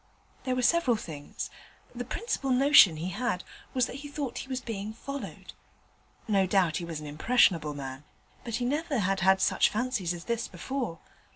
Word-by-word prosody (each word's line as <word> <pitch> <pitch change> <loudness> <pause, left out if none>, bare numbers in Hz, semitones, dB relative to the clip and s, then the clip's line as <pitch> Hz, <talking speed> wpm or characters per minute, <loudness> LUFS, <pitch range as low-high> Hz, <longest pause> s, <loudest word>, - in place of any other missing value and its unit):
There 255 -1 0
were 255 - 0
several 335 -4 +4
things; 155 -9 -7 0.4
the 245 0 -4
principal 275 - -3
notion 255 - +7
he 170 +4 -3
had 200 -1 -2 0.3
was 255 -2 +3
that 255 - -7
he 290 +1 -8
thought 285 -3 -4
he - - -7
was 260 -1 -2
being 215 -3 -5
followed. 275 +4 -7 0.7
No 195 -3 +3
doubt 185 -4 +2
he 175 - -4
was 165 -2 -5
an 150 - -8
impressionable 155 -1 +2
man, 135 0 -6 0.4
but 235 -2 -3
he 245 +1 -1
never 295 +2 0
had 195 -2 +1
had 190 +1 +4
such - - +3
fancies 215 -7 -1
as 170 - -8
this 235 +1 -2
before. 230 0 -4
225 Hz, 180 wpm, -29 LUFS, 175-255 Hz, 0.7 s, notion